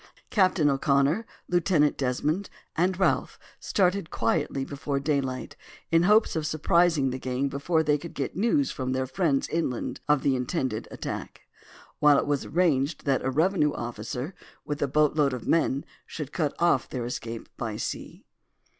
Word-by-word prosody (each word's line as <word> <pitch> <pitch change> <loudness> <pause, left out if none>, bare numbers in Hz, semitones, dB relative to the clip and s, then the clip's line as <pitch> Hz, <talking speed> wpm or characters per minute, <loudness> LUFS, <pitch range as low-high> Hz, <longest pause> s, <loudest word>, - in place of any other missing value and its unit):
Captain 185 -7 +3
O'Connor, 140 +8 +2 0.2
Lieutenant 170 -4 +2
Desmond, 150 +8 -1 0.3
and 180 +2 +1
Ralph 190 - +1 0.2
started 185 -2 +1
quietly 145 -4 0
before 140 0 -3
daylight 140 -3 -2 0.4
in 165 0 +5
hopes 210 +3 +4
of 155 -1 -1
surprising 155 -2 +2
the 130 - -4
gang 130 +2 -1
before 160 +4 0
they 150 -1 +2
could 170 +2 -9
get 135 - -3
news 235 - +2
from 130 -1 -3
their 130 0 0
friends 135 +1 0
inland 155 -7 -2
of 150 -2 +3
the 135 - +3
intended 125 -3 -2
attack; - - -6 0.6
while 150 -1 +6
it - - +1
was 145 -1 -1
arranged 155 -4 +1
that 135 -2 +2
a 130 - 0
revenue 155 +1 +2
officer, 120 - -5 0.3
with 145 0 -4
a 145 - +2
boat 150 +2 +2
load 145 -3 +2
of 125 - -6
men, 140 -4 +2 0.2
should 150 -3 -6
cut 150 -5 -1
off 170 -7 +2
their 125 -3 -3
escape 115 -1 -5
by 110 -3 -4
sea. - - -6
145 Hz, 160 wpm, -27 LUFS, 130-170 Hz, 0.6 s, while